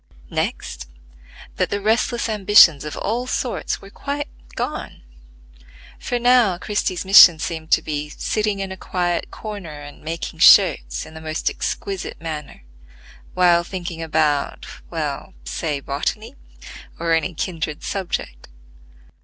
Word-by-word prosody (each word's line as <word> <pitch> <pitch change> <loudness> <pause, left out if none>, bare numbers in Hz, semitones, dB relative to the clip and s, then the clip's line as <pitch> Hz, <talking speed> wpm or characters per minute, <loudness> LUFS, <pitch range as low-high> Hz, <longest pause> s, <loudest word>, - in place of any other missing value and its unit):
Next, 60 -1 -3 0.7
that - - +1
the 205 - -1
restless 225 +3 +1
ambitions 200 -8 +6
of 150 - -6
all 240 +5 -2
sorts 250 -5 -2
were 195 - -12
quite 285 +4 -4 0.3
gone; - - -5 1.0
for 245 - -2
now 240 -6 +4
Christie's 185 -1 -2
mission 185 -3 +9
seemed 160 0 -5
to - - +4
be 150 -1 -3
sitting 210 +4 -2
in 195 -1 -4
a 190 - -7
quiet 175 -2 -2
corner 195 -9 -8
and 145 0 -11
making 165 +2 -5
shirts 60 +1 +5
in - - -13
the 160 - -10
most 155 0 -2
exquisite 195 -2 -4
manner, 155 - -7 0.7
while 175 -2 +4
thinking 175 -2 -6
about—well, 155 -3 -2
say 140 - -3
botany, 210 - -3 0.6
or 165 0 0
any 165 +2 0
kindred 160 -3 -4
subject. 175 - -4
175 Hz, 125 wpm, -21 LUFS, 155-205 Hz, 1.0 s, mission